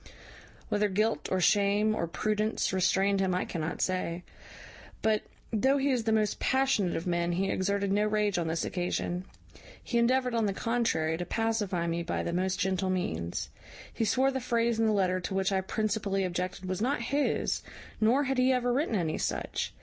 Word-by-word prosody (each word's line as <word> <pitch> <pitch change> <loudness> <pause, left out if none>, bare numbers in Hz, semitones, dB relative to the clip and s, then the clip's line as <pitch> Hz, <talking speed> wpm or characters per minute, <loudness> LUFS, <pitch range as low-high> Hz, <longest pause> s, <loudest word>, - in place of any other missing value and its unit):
"Whether 210 0 +1
guilt, 215 +4 0
or 185 - +2
shame, 205 +3 +3
or 170 -6 -1
prudence, 215 +6 -1
restrained 190 +1 +2
him 190 -2 +1
I 180 - 0
cannot 165 -1 -3
say; 180 -2 -2 0.8
but, 220 -1 +2 0.3
though 265 +6 +3
he 280 0 +1
is 245 -4 0
the 225 - +2
most 215 -1 +1
passionate 260 -9 +1
of 165 - -3
men, 175 -1 0
he 195 +2 0
exerted 200 +1 0
no 210 +1 +2
rage 210 -3 +1
on 165 - -1
this 165 +1 -1
occasion. 180 0 -2 0.6
He 235 - 0
endeavoured, 250 +1 +2
on 225 -2 +1
the 200 - -1
contrary, 195 -10 0
to 175 - -4
pacify 215 -6 0
me 170 0 -1
by 170 - -2
the 170 - -3
most 185 +2 0
gentle 190 -1 0
means. 85 - -2 0.4
He - - -1
swore 260 +5 +2
the 265 -1 -3
phrase 235 -1 +1
in 225 - +3
the - - +3
letter 185 -3 +1
to 190 +2 -4
which 190 +1 +1
I 190 -1 +1
principally 200 -1 -1
objected 180 +1 -3
was 185 +1 -2
not 265 +5 0
his, 285 0 0 0.4
nor 240 +6 +3
had 270 -1 0
he 255 +1 +4
ever 245 -1 +1
written 270 -3 0
any 165 -5 -1
such. - - -2
200 Hz, 190 wpm, -29 LUFS, 185-225 Hz, 0.8 s, he